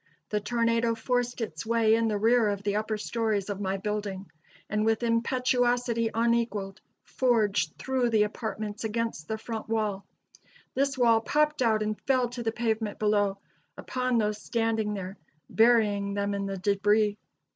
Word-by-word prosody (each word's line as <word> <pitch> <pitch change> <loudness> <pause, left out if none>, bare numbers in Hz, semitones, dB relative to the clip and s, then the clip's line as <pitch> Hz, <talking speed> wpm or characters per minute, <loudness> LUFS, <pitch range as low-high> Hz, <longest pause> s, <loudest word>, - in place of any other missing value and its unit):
The 210 - 0
tornado 230 +1 +1
forced 245 +1 -1
its 160 -8 -4
way 225 -1 +3
in 225 0 +2
the 210 -2 0
rear 225 +1 +3
of 200 -1 -3
the 205 0 0
upper 215 0 -2
stories 215 -2 -1
of 200 0 -5
my 195 0 -1
building, 200 -1 -4 0.4
and 210 0 0
with 225 +1 +1
impetuosity 240 0 +1
unequaled 230 -4 0 0.2
forged 210 -10 +1
through 260 -2 0
the 220 -2 +4
apartments 215 0 -4
against 225 -7 -3
the 220 - -2
front 220 0 -6
wall. 210 -3 -1 0.7
This 275 0 0
wall 230 -3 +4
popped 300 +3 +1
out 220 -3 +2
and 215 0 -3
fell 255 -3 +2
to 245 0 -6
the 225 -1 -1
pavement 220 -2 -2
below, 205 -2 +1 0.4
upon 255 -1 -1
those 210 -1 0
standing 225 -2 -1
there, 190 0 -6 0.3
burying 210 -4 +3
them 200 0 -1
in 200 0 -2
the 195 0 -4
debris. 205 +2 +2
220 Hz, 155 wpm, -28 LUFS, 205-235 Hz, 0.7 s, the